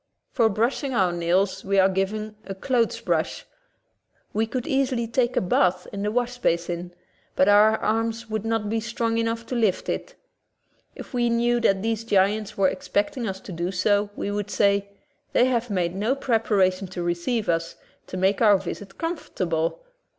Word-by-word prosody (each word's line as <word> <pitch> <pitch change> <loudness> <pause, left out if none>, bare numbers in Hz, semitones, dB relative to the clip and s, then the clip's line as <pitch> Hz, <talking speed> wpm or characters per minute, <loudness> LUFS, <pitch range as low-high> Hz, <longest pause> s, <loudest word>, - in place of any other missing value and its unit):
For 230 -4 +3
brushing 240 +5 -1
our 185 -5 +3
nails 175 +3 +1
we 195 0 0
are 190 0 +6
given 210 +3 -2
a 195 - -6
clothes 235 +3 0
brush. - - -1 0.9
We 220 +2 +1
could 250 +1 -3
easily 265 -3 0
take 240 +2 0
a - - +4
bath 180 0 +2
in 200 - -4
the 210 - 0
wash 245 +1 -1
basin, 175 -2 -1 0.4
but 185 - +4
our 210 +2 +6
arms 225 +1 -1
would 220 -1 -3
not 225 -2 -1
be 225 +2 0
strong 230 +1 -1
enough 230 0 -1
to 255 - -4
lift 220 -6 +1
it. - - -4 0.8
If - - -10
we 240 -1 +1
knew 240 +1 +2
that 195 -4 +2
these 225 0 -1
giants 205 0 +1
were 195 -1 +4
expecting 205 +7 -1
us 190 -1 -4
to - - -9
do 170 +1 -2
so, 205 +2 +1
we 200 - -3
would 205 0 -3
say: 200 -1 +2 0.4
"They 245 - +5
have 245 -2 0
made 180 -4 0
no 215 +7 0
prepara 220 -8 +2
tion 185 +1 -7
to 180 -1 -5
receive 175 +7 -1
us, 165 0 -1 0.3
to 185 - -6
make 190 +3 +1
our 210 -3 +6
visit 195 +1 -7
comfort 330 0 -5
able." 165 - -1
210 Hz, 180 wpm, -24 LUFS, 190-230 Hz, 0.9 s, are